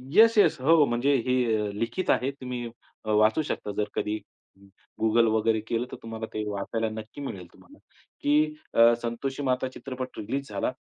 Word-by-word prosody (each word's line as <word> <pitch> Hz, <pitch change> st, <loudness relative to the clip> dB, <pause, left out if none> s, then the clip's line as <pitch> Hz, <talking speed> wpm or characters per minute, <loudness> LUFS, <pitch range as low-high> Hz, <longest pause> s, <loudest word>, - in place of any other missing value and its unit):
Yes yes 220 Hz, -8 st, +6 dB
हो, 155 Hz, +2 st, +5 dB
म्हणजे 125 Hz, +3 st, +1 dB
हे 125 Hz, 0 st, +3 dB
अ, 105 Hz, -1 st, -1 dB
लिखित 115 Hz, -, -3 dB
आहे. 130 Hz, +2 st, +1 dB
तुम्ही 125 Hz, -3 st, -6 dB, 0.4 s
वाचू 110 Hz, +5 st, +3 dB
शकता 105 Hz, -, -4 dB
जर 105 Hz, 0 st, 0 dB
कधी 105 Hz, +1 st, -1 dB, 0.8 s
Google 115 Hz, +1 st, +4 dB
वगैरे 110 Hz, 0 st, +2 dB
केलं. 115 Hz, +1 st, -1 dB
तर -, -, -7 dB
तुम्हाला 115 Hz, 0 st, -5 dB
ते 110 Hz, -, -2 dB
वाचायला 110 Hz, +3 st, -2 dB
नक्की 110 Hz, +5 st, -8 dB
मिळेल 100 Hz, -10 st, -6 dB
तुम्हाला 290 Hz, -, -18 dB, 0.4 s
की 295 Hz, +1 st, +4 dB, 0.3 s
अ, 115 Hz, +1 st, +7 dB
संतोषी 130 Hz, +4 st, -3 dB
माता 130 Hz, -1 st, 0 dB
चित्रपट 130 Hz, -1 st, -7 dB
रिलीज 135 Hz, +6 st, -4 dB
झाला -, -, -1 dB
120 Hz, 160 wpm, -27 LUFS, 110-140 Hz, 0.8 s, अ